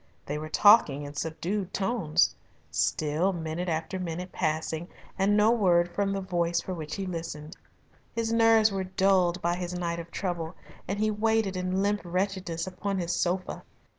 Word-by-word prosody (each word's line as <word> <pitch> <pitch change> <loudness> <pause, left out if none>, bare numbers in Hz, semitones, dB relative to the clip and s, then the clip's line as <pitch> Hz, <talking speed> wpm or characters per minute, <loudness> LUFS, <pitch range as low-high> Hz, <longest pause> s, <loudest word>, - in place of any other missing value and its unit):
They 150 +1 -3
were 155 0 -6
talking 155 -7 +5
in 145 0 -7
subdued 175 +5 -3
tones. 195 -6 +2 0.4
Still 150 - +1
minute 170 +1 -3
after 160 +3 -2
minute 180 +1 -4
passing, 160 0 -2 0.3
and 200 +2 +2
no 210 +2 +5
word 175 -6 +3
from 200 +1 0
the 195 0 -2
voice 175 -2 0
for 185 - -5
which 155 -3 -5
he 195 - -3
listened. 165 -2 -6 0.6
His 230 -1 0
nerves 225 -1 +5
were 190 -1 -2
dulled 185 -1 +2
by 170 +1 +1
his 180 0 -4
night 170 -1 -2
of 170 0 -8
trouble, 175 -2 -3 0.3
and 195 - -2
he 215 +1 +1
waited 220 -2 +1
in 185 +1 0
limp 205 +1 +1
wretchedness 180 -2 -2
upon 190 +1 -3
his 175 -1 -1
sofa. 180 +1 -1
180 Hz, 165 wpm, -28 LUFS, 165-195 Hz, 0.6 s, talking